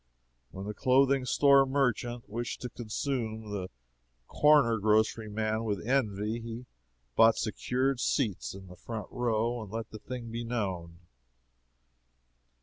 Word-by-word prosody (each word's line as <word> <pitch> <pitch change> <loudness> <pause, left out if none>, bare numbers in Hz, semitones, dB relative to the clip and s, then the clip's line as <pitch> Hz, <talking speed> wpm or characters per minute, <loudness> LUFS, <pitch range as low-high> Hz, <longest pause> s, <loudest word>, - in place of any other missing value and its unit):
When 95 +1 -8
the 105 - -4
clothing 130 +3 +3
store 140 +1 +5
merchant 125 -3 0
wished 115 +3 -4
to 125 - -5
consume 110 -2 -3
the 95 -3 -4 0.6
corner 145 -7 +4
grocery 110 +1 +2
man 110 +1 -1
with 105 -1 -3
envy, 110 -4 0
he 115 +1 -7 0.5
bought 115 0 +6
secured 130 +4 -1
seats 110 - -1
in 95 0 -10
the 90 -1 -12
front 110 +4 -6
row 120 0 0
and 105 - -8
let 115 0 -5
the 110 - -8
thing 120 0 -7
be 115 +1 -4
known. 95 -8 -3
115 Hz, 135 wpm, -30 LUFS, 105-125 Hz, 0.6 s, bought